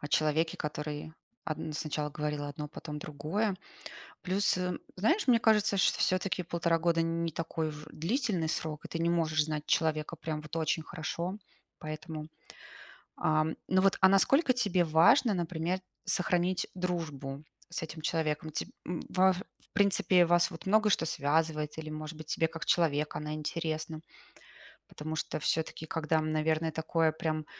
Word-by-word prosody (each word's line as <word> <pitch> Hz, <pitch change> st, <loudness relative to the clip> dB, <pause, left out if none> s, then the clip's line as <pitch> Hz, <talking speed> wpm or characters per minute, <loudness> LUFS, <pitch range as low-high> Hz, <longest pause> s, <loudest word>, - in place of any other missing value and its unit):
о 145 Hz, -, -5 dB
человеке, 155 Hz, +2 st, +2 dB
который 150 Hz, +1 st, -4 dB, 0.3 s
одн 155 Hz, 0 st, -3 dB
сначала 150 Hz, -1 st, -2 dB
говорил 150 Hz, 0 st, -2 dB
одно, 145 Hz, +1 st, -5 dB
потом 150 Hz, 0 st, -7 dB
другое. 165 Hz, +8 st, -2 dB, 0.7 s
Плюс, 190 Hz, +1 st, +2 dB
э, 180 Hz, -1 st, -1 dB, 0.2 s
знаешь, 245 Hz, -, +2 dB
мне 235 Hz, -2 st, +6 dB
кажется, 210 Hz, -3 st, +3 dB
что -, -, +3 dB
всё-таки 185 Hz, 0 st, +1 dB
1,5 170 Hz, 0 st, +1 dB
года- 165 Hz, 0 st, +2 dB
не 165 Hz, 0 st, -1 dB
такой 165 Hz, 0 st, -2 dB
уж 150 Hz, 0 st, -8 dB
длительный 180 Hz, -, 0 dB
срок, 155 Hz, -2 st, -3 dB
и -, -, -4 dB
ты 165 Hz, -, -4 dB
не 170 Hz, -, +2 dB
можешь 155 Hz, -3 st, +2 dB
знать 150 Hz, -1 st, -3 dB
человека 155 Hz, 0 st, +1 dB
прям 155 Hz, -1 st, -4 dB
вот 150 Hz, +2 st, -8 dB
очень 160 Hz, 0 st, 0 dB
хорошо. 170 Hz, +4 st, -4 dB, 0.4 s
Поэтому, 155 Hz, 0 st, -6 dB, 0.9 s
ам, 155 Hz, 0 st, +1 dB
ну 185 Hz, 0 st, +4 dB
вот 195 Hz, 0 st, +3 dB
а 190 Hz, -, +8 dB
насколько 255 Hz, -, +4 dB
тебе 205 Hz, -8 st, +2 dB
важно, 165 Hz, -, +5 dB
например, 175 Hz, +1 st, -1 dB, 0.2 s
сохранить 180 Hz, 0 st, +1 dB
дружбу 155 Hz, -6 st, -3 dB, 0.3 s
с 170 Hz, -, -3 dB
этим 160 Hz, 0 st, -6 dB
человеком? 155 Hz, -1 st, -1 dB
Теб 155 Hz, -, -3 dB, 0.2 s
м, 175 Hz, 0 st, -3 dB
ваф 185 Hz, 0 st, +4 dB, 0.2 s
в -, -, -28 dB
принципе, 185 Hz, -3 st, +4 dB
вас 175 Hz, +1 st, +3 dB
вот 165 Hz, +2 st, -10 dB
много 215 Hz, +2 st, +4 dB
что 190 Hz, -, +3 dB
связывает 155 Hz, +1 st, 0 dB
или, 155 Hz, -1 st, -5 dB
может 155 Hz, +1 st, -6 dB
быть, 155 Hz, -1 st, -10 dB
тебе 165 Hz, -, +2 dB
как 165 Hz, 0 st, -6 dB
человек 150 Hz, -3 st, +2 dB
она 150 Hz, 0 st, -3 dB
интересна? 155 Hz, 0 st, -3 dB, 0.9 s
Потому 155 Hz, +1 st, -5 dB
что 155 Hz, -, -2 dB
всё-таки, 160 Hz, +1 st, -1 dB
когда, 160 Hz, 0 st, 0 dB
м, 155 Hz, 0 st, 0 dB
наверное, 155 Hz, +1 st, +1 dB
такое 160 Hz, 0 st, +1 dB
прям 155 Hz, -1 st, -2 dB
160 Hz, 160 wpm, -31 LUFS, 155-180 Hz, 0.9 s, а